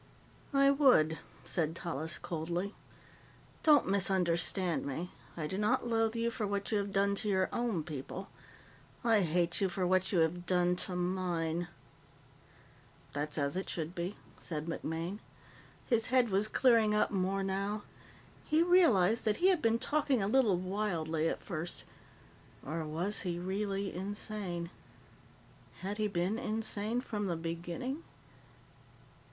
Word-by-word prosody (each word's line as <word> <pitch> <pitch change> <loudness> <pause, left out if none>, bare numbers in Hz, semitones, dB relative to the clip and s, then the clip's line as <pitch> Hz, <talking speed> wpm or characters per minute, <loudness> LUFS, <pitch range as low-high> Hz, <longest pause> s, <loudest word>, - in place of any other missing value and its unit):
"I 275 0 +6
would," 250 - +4 0.2
said 165 -3 -1
Tallis 160 -1 -2
coldly. 175 +4 -3 0.9
"Don't 300 -3 +6
misunderstand 180 -2 +2
me. 165 +6 -4 0.3
I 155 - -2
do 190 +6 -3
not 210 +3 +2
loathe 225 -1 +1
you 230 0 0
for 220 -2 -2
what 200 +1 -2
you 210 - +2
have 200 0 -3
done 200 +1 +2
to 210 +1 -1
your 190 -1 +2
own 230 -9 0
people; 155 +5 -6 0.8
I 225 -3 +4
hate 175 +1 +1
you 195 - +3
for 180 +1 -1
what 185 +1 +2
you 190 - +2
have 175 +2 0
done 180 0 +3
to 180 - -4
mine." 175 -2 -1 1.5
"That's 145 +1 -2
as 140 0 0
it 190 - -3
should 165 0 -3
be," 180 +3 -3 0.2
said 155 -2 -3
MacMaine. 165 +3 -3 0.7
His 230 -3 +2
head 250 -3 +3
was 200 +3 +2
clearing 225 -3 +4
up 210 - +2
more 195 0 0
now. 195 +2 -2 0.6
He 315 +2 +3
realized 235 - +4
that 215 -1 +2
he 370 - +4
had 365 -4 +3
been 230 0 +3
talking 285 0 +1
a 195 - 0
little 220 -5 +4
wildly 175 -4 -1
at - - -4
first. 170 -1 -5 0.8
Or 160 +3 -3
was 170 +7 -2
he 175 -2 -2
really 195 +2 -2
insane? 190 -2 -4 1.1
Had 200 +3 -4
he 215 - +2
been 195 +3 -1
insane 220 -1 -1
from 210 -5 -3
the 175 - 0
beginning? 170 - -4
190 Hz, 145 wpm, -33 LUFS, 170-215 Hz, 1.5 s, I